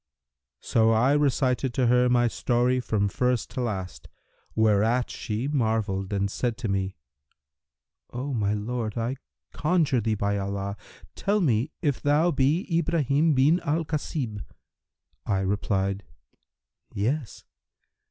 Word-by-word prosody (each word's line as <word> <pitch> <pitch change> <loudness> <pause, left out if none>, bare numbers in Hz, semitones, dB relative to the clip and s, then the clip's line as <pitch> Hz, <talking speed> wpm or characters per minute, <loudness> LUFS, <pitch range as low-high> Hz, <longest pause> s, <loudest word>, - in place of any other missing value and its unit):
So 110 -1 +2
I 115 +5 +3
recited 135 -3 +1
to 130 - +2
her 125 +1 +4
my 120 -1 +3
story 125 +2 +1
from 105 -4 0
first 125 +4 0
to 130 - -3
last, 95 -6 -4 0.5
whereat 110 +3 +2
she 110 +4 -3
marvelled 110 -8 -1
and 100 -1 0
said 120 -3 -2
to 115 - -3
me, 95 -1 -1 1.2
'O 130 +3 -4
my 105 -3 0
lord, 110 +1 -3
I 120 +4 -2 0.4
conjure 150 -6 +1
thee 110 0 0
by 100 0 -1
Allah, 100 0 -3 0.4
tell 205 +1 0
me 130 - +1
if 145 -5 0
thou 150 +4 +3
be 145 +6 +1
Ibrahim 155 -2 +2
bin 145 +7 +4
al 160 0 -1
Khasib?' 140 -8 -3 0.8
I 95 -2 +1
replied, 100 0 -1 0.9
'Yes!' 120 +5 -2
120 Hz, 125 wpm, -26 LUFS, 105-140 Hz, 1.2 s, her